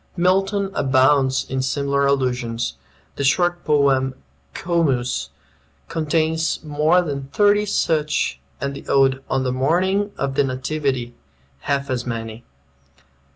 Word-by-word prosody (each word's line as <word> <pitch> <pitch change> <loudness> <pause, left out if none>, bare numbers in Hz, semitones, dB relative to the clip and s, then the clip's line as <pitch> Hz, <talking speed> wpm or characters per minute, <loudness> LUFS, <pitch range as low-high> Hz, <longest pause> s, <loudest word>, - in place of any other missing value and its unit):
Milton 195 +2 +1
abounds 130 -1 +3
in 130 0 -2
similar 140 +1 0
allusions. 125 - -1 0.4
The 140 - -2
short 175 +5 +2
poem 135 -3 +2 0.4
"Comus" 130 - 0 0.6
contains 160 0 0
more 155 +4 +2
than 140 -4 -4
thirty 205 +5 +3
such, 150 - 0 0.2
and 140 - -3
the 140 - -10
ode 135 -1 +3
"On 135 0 0
the 125 -1 -1
Morning 185 +10 +1
of 140 -1 -2
the 140 - +2
Nativity" 130 -2 -2 0.5
half 140 - -2
as 125 -2 -1
many. 115 0 -5
140 Hz, 115 wpm, -21 LUFS, 130-165 Hz, 0.6 s, abounds